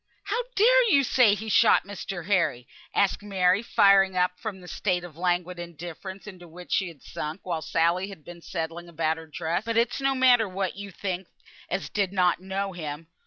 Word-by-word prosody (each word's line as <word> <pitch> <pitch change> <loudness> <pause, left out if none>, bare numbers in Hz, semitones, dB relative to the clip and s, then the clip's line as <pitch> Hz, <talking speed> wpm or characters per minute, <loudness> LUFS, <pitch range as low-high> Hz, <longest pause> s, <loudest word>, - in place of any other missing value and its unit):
"How 415 +4 -1
dare - - +5
you 280 -7 +5
say 240 -5 +4
he 220 +2 -7
shot 210 - +5
Mr. 195 -3 -6
Harry?" 160 -11 +1 0.2
asked 200 0 +1
Mary, 190 -1 +2
firing 195 -4 +4
up 180 0 +1
from 195 0 -5
the 180 - -13
state 180 -1 -1
of 175 -4 -10
languid 180 0 -1
indifference 175 +3 -8
into 185 -4 -11
which 175 +2 -12
she 190 - +1
had 160 -6 -12
sunk 155 +5 -6
while 170 -3 -3
Sally 170 +4 +1
had 175 -7 -12
been 175 -1 -11
settling 165 0 -5
about 160 -1 -1
her 165 0 -10
dress. 165 +4 -2
"But 230 0 -2
it's 235 +3 +1
no 270 0 +1
matter 245 -5 +4
what 190 0 -3
you 200 +1 -7
think 185 -1 -4 0.4
as - - -2
did 200 -2 -1
not 180 -3 +2
know 195 +1 -3
him. 160 -1 -6
185 Hz, 195 wpm, -26 LUFS, 170-200 Hz, 0.4 s, dare